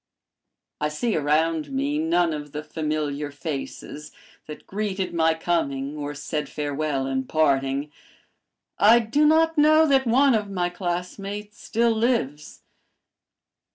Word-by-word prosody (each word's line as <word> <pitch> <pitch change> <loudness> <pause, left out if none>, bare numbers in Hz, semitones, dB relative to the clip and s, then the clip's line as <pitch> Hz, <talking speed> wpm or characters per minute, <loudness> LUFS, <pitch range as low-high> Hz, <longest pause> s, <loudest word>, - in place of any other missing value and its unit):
"I 150 - 0
see 210 +9 -1
around 155 0 +1
me 140 +2 -1
none 165 +1 +2
of 150 -1 -7
the 150 +1 -4
familiar 150 -2 -3
faces 150 0 -6 0.4
that 150 - -9
greeted 195 -2 -3
my 160 -1 +2
coming 145 -4 -1
or 145 -1 -5
said 150 +1 -4
farewell 145 -2 -2
in 130 -1 -2
parting. 140 -1 +1 0.9
I 220 +3 +7
do 240 +7 +2
not 320 0 +3
know 310 +1 +6
that 270 -3 +3
one 265 +3 +4
of 210 -2 0
my 180 -2 -1
classmates 195 +3 -5
still 235 +1 +1
lives. 220 - -1
160 Hz, 125 wpm, -24 LUFS, 145-210 Hz, 0.9 s, I